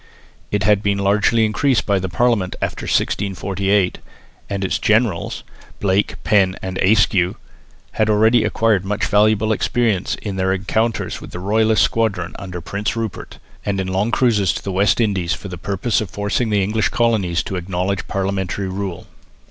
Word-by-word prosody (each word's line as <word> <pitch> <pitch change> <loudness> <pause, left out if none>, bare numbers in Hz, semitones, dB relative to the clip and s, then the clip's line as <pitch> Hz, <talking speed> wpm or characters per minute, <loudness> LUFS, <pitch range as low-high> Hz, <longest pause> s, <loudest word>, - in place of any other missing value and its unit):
It 105 0 0
had 105 0 +3
been 100 -2 0
largely 105 +3 +2
increased 125 +5 +1
by 100 -2 +2
the 95 0 -3
Parliament 115 -3 +1
after - - -3
1648; 100 0 0 0.5
and 100 -1 -2
its - - -1
"generals," 110 -5 +1 0.4
Blake, 100 0 +1
Penn 95 -3 +3
and 95 0 -5
Ayscue, 95 -2 +3 0.6
had 110 0 0
already 110 +2 +4
acquired 110 -4 +1
much 105 +2 -1
valuable 110 +1 +3
experience 110 -3 0
in 100 -3 -6
their 95 0 +1
encounters 110 +4 -1
with - - -9
the 90 - -7
royalist 110 +3 +2
squadron 100 -7 0
under 90 -3 -6
Prince 100 +6 -3
Rupert, 115 -3 -5 0.3
and 100 -1 -1
in 95 - -1
long 95 +4 0
cruises 110 -7 +2
to - - -6
the 100 - -3
West 100 +3 +2
Indies 95 -7 +1
for 100 - -9
the 90 - -6
purpose 100 +6 -1
of 105 - -5
forcing 105 +3 -1
the 105 -2 +2
English 105 +2 0
colonies 105 -8 +1
to 95 - -5
acknowledge 90 +2 -2
parliamentary 95 -1 -2
rule. 95 -2 -5
100 Hz, 165 wpm, -19 LUFS, 95-110 Hz, 0.6 s, already